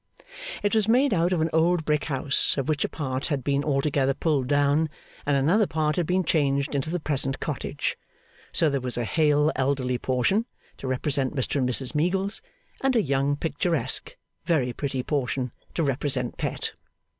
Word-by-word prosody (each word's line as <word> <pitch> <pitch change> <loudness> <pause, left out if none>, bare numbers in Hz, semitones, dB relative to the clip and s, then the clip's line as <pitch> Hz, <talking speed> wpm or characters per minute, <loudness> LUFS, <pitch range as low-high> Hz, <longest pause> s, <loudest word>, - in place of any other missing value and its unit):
It 205 - +1
was 220 -2 +3
made 255 +3 +4
out 175 0 +2
of 175 -3 +1
an 160 - +1
old 165 0 +2
brick 150 -1 +1
house, 135 -1 +2
of 135 - -1
which 155 -2 +1
a - - -1
part 130 -3 -3
had 145 -5 -2
been 140 +1 +1
altogether 135 -2 +1
pulled 145 -6 0
down, 145 +2 +2 0.4
and 145 -1 +3
another 180 +10 +3
part 155 -1 0
had 175 -3 0
been 185 +1 +2
changed 140 -3 +1
into 140 +2 -1
the 175 +2 -1
present 135 -3 -1
cottage; - - -3 0.5
so 165 - +3
there 140 -2 0
was 125 -1 -3
a 120 - 0
hale 150 +4 +3
elderly 130 -2 0
portion, 135 - +1 0.3
to 135 - -6
represent 130 +1 0
Mr 135 +1 -1
and 130 -2 +1
Mrs 125 +2 +1
Meagles, 190 +6 0 0.4
and 270 -1 +2
a 230 - +5
young 140 0 +1
picturesque, 165 +2 -1 0.3
very 150 -8 +1
pretty 135 -2 -3
portion 130 -3 -1 0.2
to 165 - +1
represent 135 -2 0
Pet. - - -3
145 Hz, 180 wpm, -26 LUFS, 135-165 Hz, 0.5 s, a